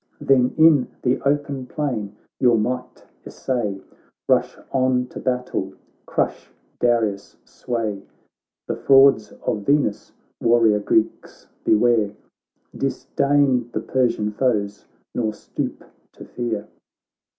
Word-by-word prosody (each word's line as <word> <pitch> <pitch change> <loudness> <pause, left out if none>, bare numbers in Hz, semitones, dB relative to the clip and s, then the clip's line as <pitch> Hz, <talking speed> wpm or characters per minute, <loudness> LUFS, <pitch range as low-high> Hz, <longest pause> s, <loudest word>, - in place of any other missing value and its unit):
Then 130 -2 +2
in 155 -5 +6 0.2
the 125 0 +1
open 140 -2 -1
plain 120 -9 -3 0.2
your 120 -2 +4
might 125 +4 -3 0.2
essay. 110 -7 -3 0.5
Rush - - +2
on 130 -1 +2
to - - -8
battle, 125 -6 -2 0.3
crush - - -2 0.3
Darius' 110 -5 0
sway; 110 -5 -4 0.7
The - - -2
frauds 135 -5 +5
of 105 - -1
Venus, 135 -2 0 0.3
warrior 115 -3 +4
Greeks, 110 +1 -1 0.2
beware, 110 -2 +3 0.6
Disdain 140 -4 +1
the - - -1
Persian 120 -5 0
foes, 105 -3 -1 0.3
nor 110 -3 -1
stoop - - -5 0.3
to - - -12
fear.' 115 -4 -4
120 Hz, 105 wpm, -22 LUFS, 105-130 Hz, 0.7 s, in